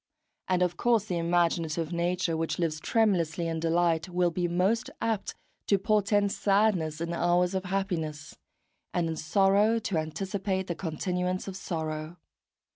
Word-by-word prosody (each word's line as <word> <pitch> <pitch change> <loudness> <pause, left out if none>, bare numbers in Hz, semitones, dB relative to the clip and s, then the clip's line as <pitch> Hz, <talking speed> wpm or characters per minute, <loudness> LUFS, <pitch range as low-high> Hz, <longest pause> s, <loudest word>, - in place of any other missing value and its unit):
And 180 -1 +2
of 175 -1 -1
course 235 -4 +2
the 180 -5 -2
imaginative 170 -1 0
nature 170 0 0
which 160 0 -2
lives 160 -3 -1
tremulously 175 -6 +1
in 165 -1 -2
delight 165 +1 +1
will 175 -1 +1
be 175 +1 -1
most 190 +7 +1
apt 225 -3 -2 0.3
to 200 - +4
portend 205 0 +2
sadness 195 -8 +1
in 170 0 -2
hours 175 +2 +2
of 190 0 -2
happiness, 170 -6 -3 0.6
and 175 -2 +1
in 160 - -2
sorrow 195 +7 +3
to 205 -5 -2
anticipate 190 +4 -2
the 175 - -2
continuance 180 +3 -2
of 190 - -5
sorrow. 160 -2 -4
180 Hz, 145 wpm, -28 LUFS, 165-195 Hz, 0.6 s, to